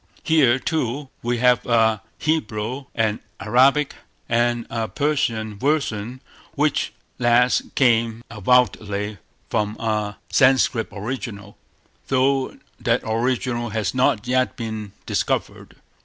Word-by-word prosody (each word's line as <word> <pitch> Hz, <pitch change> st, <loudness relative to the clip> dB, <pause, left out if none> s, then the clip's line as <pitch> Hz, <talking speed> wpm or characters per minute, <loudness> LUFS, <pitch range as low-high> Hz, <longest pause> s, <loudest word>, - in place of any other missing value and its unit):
Here, 145 Hz, -7 st, +4 dB
too, 135 Hz, -1 st, -2 dB
we 120 Hz, +1 st, -1 dB
have 125 Hz, 0 st, +3 dB
a 110 Hz, -3 st, +3 dB, 0.2 s
Hebrew, 130 Hz, -4 st, -2 dB
an 110 Hz, -1 st, +1 dB, 0.2 s
Arabic, 140 Hz, +3 st, +3 dB, 0.3 s
and 120 Hz, 0 st, +1 dB
a 115 Hz, -1 st, -2 dB
Persian 110 Hz, -4 st, -1 dB
version; 130 Hz, -4 st, -1 dB, 0.3 s
which -, -, +1 dB, 0.3 s
last 125 Hz, +1 st, +2 dB
came 115 Hz, -3 st, +2 dB
avowedly 105 Hz, -2 st, +1 dB, 0.3 s
from 105 Hz, -1 st, 0 dB
a 105 Hz, -2 st, -1 dB
Sanscrit 130 Hz, -3 st, +3 dB
original, 105 Hz, -2 st, -6 dB, 0.5 s
though 135 Hz, 0 st, +1 dB, 0.2 s
that -, -, +1 dB
original 120 Hz, +1 st, -1 dB
has 110 Hz, -1 st, -2 dB
not 125 Hz, -4 st, +2 dB
yet 130 Hz, +1 st, +1 dB
been 110 Hz, -3 st, -5 dB
discovered. -, -, -2 dB
120 Hz, 105 wpm, -22 LUFS, 110-130 Hz, 0.5 s, Here